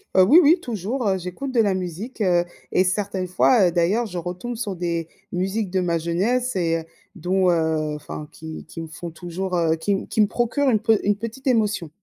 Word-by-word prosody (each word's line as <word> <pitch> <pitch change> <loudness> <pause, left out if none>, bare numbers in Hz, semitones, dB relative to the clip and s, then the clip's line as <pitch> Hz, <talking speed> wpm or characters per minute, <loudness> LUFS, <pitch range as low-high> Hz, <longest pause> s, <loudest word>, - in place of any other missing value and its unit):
Heu, 190 - +7
oui, 290 - +8
oui, 330 +4 +5
toujours, 225 +2 -3
heu, 190 - +1
j'écoute 185 +10 -5
de 245 - +1
la 205 -3 +3
musique, 185 +7 -5
heu 175 -3 +3 0.3
et 185 - +4
certaines 190 -1 -1
fois, 185 +1 +4
heu, - - -4
d'ailleurs, 185 +8 +2
je 180 -5 -5
retombe 180 +8 -5
sur 215 -4 -3
des 170 -2 -2 0.2
musiques 190 +2 -1
de 190 - +1
ma 170 -2 +1
jeunesse 205 +10 0
et 165 -3 +1
heu, - - -11 0.3
dont, 185 +1 +1
heu 160 -2 +1
enfin 150 0 -7
qui 160 0 -8
qui 165 0 -8
me - - -7
font 170 +2 -7
toujours, 180 +2 -4
heu, 160 -1 +2
qui 180 +5 -1
m 195 - -3
qui 215 - +1
me 210 - +5
procurent 255 +6 +1
une 220 - +3
pe 220 -1 +3
une 205 0 +2
petite 230 +5 -7
émotion. 210 -8 +1
190 Hz, 220 wpm, -23 LUFS, 170-220 Hz, 0.3 s, oui